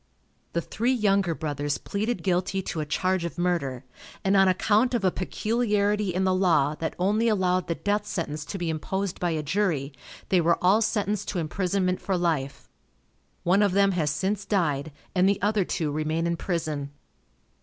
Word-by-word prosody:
The 170 - 0
three 235 +9 0
Younger 200 -7 +2
Brothers 145 -1 -2
pleaded 210 -1 -3
guilty 190 +1 0
to 165 - -4
a 150 - -3
charge 185 +3 0
of 170 - -5
murder, 145 -8 -1 0.4
and 195 +1 +2
on 195 -1 +6
account 215 +6 +2
of 230 - -1
a 185 - +4
peculiarity 210 0 0
in 185 +2 0
the 190 0 +2
law, 165 -6 +3
that 160 - -3
only 210 +5 +2
allowed 185 -4 +1
the 170 - -1
death 205 +3 -1
sentence 155 -3 -3
to 195 - -5
be 170 -3 -2
imposed 190 +4 -3
by 175 - 0
a 160 -2 -1
jury, 150 -5 0 0.4
they 185 -2 +4
were 170 +1 +3
all 195 +5 +4
sentenced 210 -2 0
to 195 - -3
imprisonment 185 +2 -1
for 190 -2 -1
life. 140 -6 -1 0.8
One 185 +4 +3
of 200 -3 +3
them 195 0 +4
has 165 -5 0
since 190 +7 -1
died, 160 -7 0 0.2
and 185 +1 +4
the 200 0 +1
other 205 0 +2
two 160 -3 -2
remain 155 +2 -1
in 170 0 0
prison. 155 -5 -3
185 Hz, 180 wpm, -26 LUFS, 160-200 Hz, 0.8 s, on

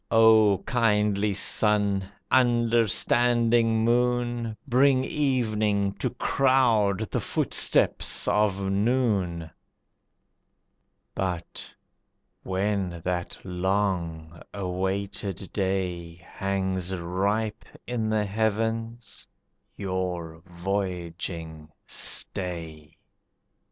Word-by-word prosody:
O 110 -3 +5
Kindly 105 -3 +1
Sun! 100 -1 +2 0.2
Understanding 120 -1 +3
Moon! 120 -1 0
Bring 130 +1 +3
evening 110 -8 0
to - - -1
crowd 120 -7 +2
the - - 0
footsteps - - +2
of 100 -2 +1
noon. 95 -5 0 1.6
But 90 -3 -4 0.7
when 95 -2 -2
that 90 -1 -3
long 90 -3 -2
awaited 95 +1 -3
day 90 -4 -2
Hangs 95 +1 -3
ripe 100 +5 -2 0.2
in 115 -3 -2
the 110 -1 +1
heavens, 110 +1 -3 0.5
your 90 -4 -4
voyaging 85 -4 -4 0.2
stay. 80 -5 -2
100 Hz, 70 wpm, -26 LUFS, 90-115 Hz, 1.6 s, O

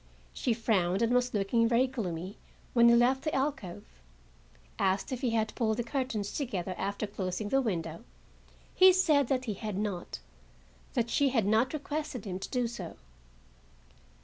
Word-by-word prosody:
She 235 - 0
frowned 200 -3 +1
and 230 +1 +2
was 250 0 +2
looking 220 +3 +2
very 240 +2 +3
gloomy 195 -7 -5 0.3
when 235 -1 +6
he 235 - +6
left 250 +3 +3
the 310 - -2
alcove. 270 -10 -2 1.0
Asked 190 +5 +1
if 255 -1 -3
he 255 - +1
had 220 -1 0
pulled 220 -3 0
the 240 - 0
curtains 235 -5 -2
together 190 - -3
after 200 +3 -2
closing 200 0 -4
the 270 +3 +3
window, 170 -5 -3 0.7
he 375 0 +7
said 305 -7 +3
that 255 -1 0
he 220 - -2
had 210 -1 -5
not; 200 -4 -3 0.8
that 235 -2 0
she 285 -2 +3
had 230 -6 +1
not 220 +5 +3
requested 295 -4 -4
him 185 -2 -4
to - - -6
do 250 -1 0
so. 200 -8 -7
230 Hz, 165 wpm, -30 LUFS, 200-255 Hz, 1.0 s, he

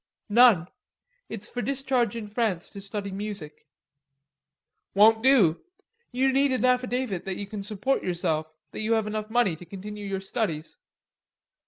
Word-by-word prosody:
"None. 215 -6 +6 0.6
It's 210 -2 -5
for 245 - -4
discharge 255 -2 0
in 230 -2 -5
France 210 -5 -2
to 200 - -9
study 200 0 -5
music." 195 -7 -7 1.3
"Won't 220 +2 +6
do. 225 -11 +4 0.5
You 260 +2 +2
need 275 +1 +3
an 255 -1 +1
affidavit 250 -5 0
that 190 -1 -3
you 200 - -4
can 200 0 -6
support 215 +6 -1
yourself, 170 -3 -1 0.2
that - - -7
you 220 +1 +1
have 220 -1 +1
enough 215 0 -4
money 220 -7 +2
to 160 - -12
continue 205 +3 -8
your 195 -1 -2
studies. 190 -6 -3
210 Hz, 150 wpm, -26 LUFS, 195-245 Hz, 1.3 s, None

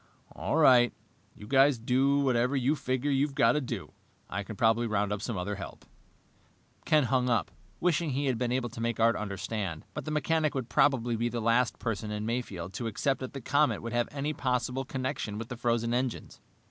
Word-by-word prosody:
"All 90 - -3
right. 125 -6 +6 0.4
You 105 - -11
guys 135 +3 +4
do 135 +5 +2
whatever 125 0 +2
you 135 +3 +2
figure 130 0 -1
you've 140 +1 +1
got 115 - +5
to 150 - 0
do. 120 -7 -5 0.4
I 100 - -2
can 110 +2 -7
probably 115 +3 +2
round 105 -1 0
up 105 - -4
some 115 -4 -3
other 90 +3 -2
help." 100 - -8 1.0
Ken 155 -1 +4
hung 125 0 +1
up, 115 -8 +1 0.3
wishing 170 -2 +1
he 140 +1 -1
had 130 -4 0
been 125 -1 0
able 125 -1 0
to 115 0 -8
make 115 0 -1
Art 115 +1 +4
understand, 100 -4 -4
but - - -5
the - - -4
mechanic 155 0 +1
would 130 -3 -3
probably 120 -5 +2
be 120 +1 0
the 120 0 -3
last 115 +2 +2
person 110 -2 -3
in 105 0 -3
Mayfield 100 -7 -4
to 115 +4 -3
accept 135 +5 0
that 130 - -6
the 135 - -6
comet 145 +4 +2
could 115 0 -5
have 120 0 +1
any 145 +1 -3
possible 130 -1 -1
connection 130 -5 -3
with 115 +1 -6
the 125 - -4
frozen 115 0 0
engines. 125 -1 -3
120 Hz, 205 wpm, -29 LUFS, 110-135 Hz, 1.0 s, right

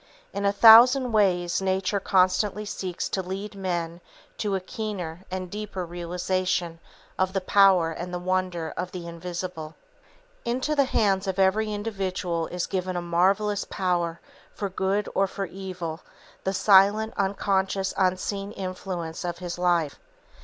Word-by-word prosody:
In 200 - -2
a 200 - +4
thousand 240 +5 +8
ways 180 -5 +2
Nature 190 +1 0
constantly 190 +3 +2
seeks 185 -3 -4
to 190 - -1
lead 195 +3 -6
men 175 -3 -3 0.4
to 205 -2 0
a - - 0
keener 185 -4 -5
and 185 -1 -5
deeper 205 -3 -5
realization 175 0 -2 0.4
of 185 0 +1
the 195 - +1
power 185 -3 +4
and 175 +2 -6
the 180 - -2
wonder 180 -2 -2
of 180 0 -4
the 175 -2 -6
invisible. 170 -1 -6 0.7
Into 255 +6 -1
the 280 -2 +4
hands 195 -6 +1
of 190 0 -2
every 205 +3 +2
individual 190 -5 -2
is 180 -1 -3
given 185 -1 -3
a 175 - -1
marvellous 195 +4 +1
power 175 -3 -1 0.4
for 200 - -3
good 190 +2 -1
or 195 - +2
for 195 +1 -4
evil, 180 -3 -6 0.5
the 190 - +1
silent, 205 +3 +4
unconscious, 195 -1 0
unseen 195 +2 -1
influence 185 -3 -5
of 175 -1 -3
his 175 -1 -6
life. 170 -5 +1
185 Hz, 145 wpm, -26 LUFS, 175-200 Hz, 0.7 s, thousand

